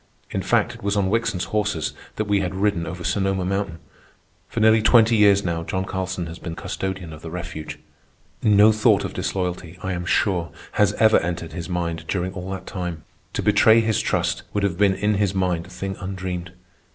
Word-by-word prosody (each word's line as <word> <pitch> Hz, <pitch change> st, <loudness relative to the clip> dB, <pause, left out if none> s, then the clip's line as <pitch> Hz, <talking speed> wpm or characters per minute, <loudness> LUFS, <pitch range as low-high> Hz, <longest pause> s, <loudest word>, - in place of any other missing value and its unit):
In -, -, -1 dB
fact, -, -, +1 dB
it -, -, -13 dB
was 100 Hz, +1 st, 0 dB
on 95 Hz, -1 st, +1 dB
Wickson's 115 Hz, -5 st, 0 dB
horses 105 Hz, -7 st, 0 dB, 0.2 s
that 110 Hz, -, -1 dB
we 100 Hz, -1 st, +2 dB
had 95 Hz, -1 st, -2 dB
ridden 95 Hz, -4 st, 0 dB
over 90 Hz, +2 st, -6 dB
Sonoma 95 Hz, -1 st, 0 dB
Mountain. 95 Hz, -2 st, -2 dB, 0.7 s
For -, -, -3 dB
nearly 110 Hz, 0 st, +5 dB
twenty 115 Hz, +1 st, +5 dB
years 100 Hz, -2 st, +5 dB
now 85 Hz, -2 st, -1 dB
John 95 Hz, +3 st, -2 dB
Carlson 95 Hz, -1 st, -3 dB
has 85 Hz, +1 st, -8 dB
been 80 Hz, -2 st, -6 dB
custodian 95 Hz, -3 st, -4 dB
of 80 Hz, -, -11 dB
the 80 Hz, -, -7 dB
refuge. 85 Hz, -2 st, -6 dB, 0.6 s
No 105 Hz, 0 st, +6 dB
thought 110 Hz, 0 st, +3 dB
of -, -, -5 dB
disloyalty, 90 Hz, -2 st, -3 dB
I 95 Hz, -, -1 dB
am 85 Hz, -1 st, -4 dB
sure, 90 Hz, -3 st, +1 dB, 0.2 s
has 105 Hz, -, +3 dB
ever 110 Hz, -1 st, +5 dB
entered 85 Hz, -1 st, -4 dB
his 85 Hz, 0 st, -6 dB
mind 85 Hz, -2 st, -2 dB
during 95 Hz, -1 st, -2 dB
all 90 Hz, 0 st, -6 dB
that 95 Hz, -1 st, -5 dB
time. 90 Hz, -4 st, -5 dB, 0.3 s
To -, -, -2 dB
betray 110 Hz, +1 st, +6 dB
his 110 Hz, -2 st, +1 dB
trust -, -, 0 dB
would 100 Hz, -, +1 dB
have 100 Hz, -4 st, +1 dB
been 100 Hz, -2 st, +4 dB
in 105 Hz, +2 st, +1 dB
his 100 Hz, -1 st, +1 dB
mind 90 Hz, -3 st, 0 dB
a -, -, -15 dB
thing 95 Hz, 0 st, -5 dB
undreamed. 90 Hz, -2 st, -5 dB
95 Hz, 200 wpm, -23 LUFS, 85-100 Hz, 0.7 s, No